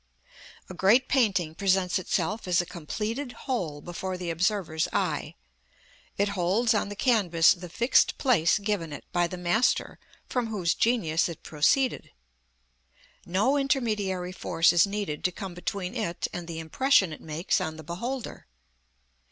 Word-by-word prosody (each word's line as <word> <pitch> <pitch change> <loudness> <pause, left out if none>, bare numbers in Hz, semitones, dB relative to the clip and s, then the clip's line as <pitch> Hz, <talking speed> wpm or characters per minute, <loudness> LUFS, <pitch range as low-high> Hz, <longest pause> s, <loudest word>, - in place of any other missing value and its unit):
A - - -8
great 215 +8 +4
painting 195 - +1
presents 190 0 +1
itself 190 +3 -2
as 180 -1 +3
a 175 - 0
completed 215 - -4
whole 170 - -2
before 185 +3 -5
the 180 -2 -3
observer's 170 -2 0
eye. - - -1 0.8
It 200 0 +1
holds 200 +5 +1
on 210 -1 0
the 205 - -6
canvas 190 -9 +4
the 180 0 -9
fixed 235 +9 +3
place 215 -11 +3
given 200 -6 -2
it - - -9
by 175 -1 +2
the 180 - -7
master 180 +7 +1 0.3
from 245 -2 -1
whose 190 -6 0
genius 180 -9 +1
it 165 - -9
proceeded. 245 - +1 1.2
No 210 +11 +2
intermediary 210 -10 -1
force 165 -3 +2
is 175 +3 +5
needed 200 -7 -4
to 180 - +2
come 195 -1 -7
between 180 +2 -4
it 210 -8 -2
and 175 -1 -6
the 165 -1 -6
impression 185 - +2
it - - -10
makes 160 +3 -1
on 160 0 -4
the 160 - -9
beholder. 235 - -5
185 Hz, 150 wpm, -27 LUFS, 170-220 Hz, 1.2 s, is